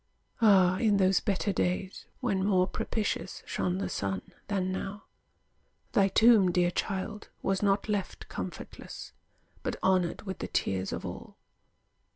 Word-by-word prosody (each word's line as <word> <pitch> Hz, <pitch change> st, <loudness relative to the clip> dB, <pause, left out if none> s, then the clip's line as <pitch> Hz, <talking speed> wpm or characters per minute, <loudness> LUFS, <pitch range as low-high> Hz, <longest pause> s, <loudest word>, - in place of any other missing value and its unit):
Ah, 190 Hz, -4 st, +6 dB
in 210 Hz, -3 st, +3 dB
those 190 Hz, -1 st, +4 dB
better 200 Hz, 0 st, 0 dB
days 185 Hz, +1 st, -2 dB
When 195 Hz, -7 st, 0 dB
more 190 Hz, -2 st, +3 dB
propitious 200 Hz, 0 st, -3 dB
shone 180 Hz, 0 st, -1 dB
the 195 Hz, -, -2 dB
sun 95 Hz, -2 st, -3 dB
than 190 Hz, -2 st, 0 dB
now, 195 Hz, +2 st, -5 dB, 0.9 s
Thy 195 Hz, -1 st, +4 dB
tomb, 215 Hz, -1 st, +6 dB
dear 175 Hz, 0 st, +2 dB
child, 205 Hz, +3 st, -3 dB
was 195 Hz, 0 st, +1 dB
not 200 Hz, 0 st, +2 dB
left 205 Hz, -3 st, -3 dB
comfortless, -, -, -7 dB, 0.5 s
But -, -, -2 dB
honored 185 Hz, -2 st, +2 dB
with 190 Hz, -2 st, -5 dB
the -, -, -3 dB
tears 95 Hz, 0 st, -1 dB
of -, -, -4 dB
all. -, -, -8 dB
190 Hz, 140 wpm, -29 LUFS, 185-205 Hz, 0.9 s, Ah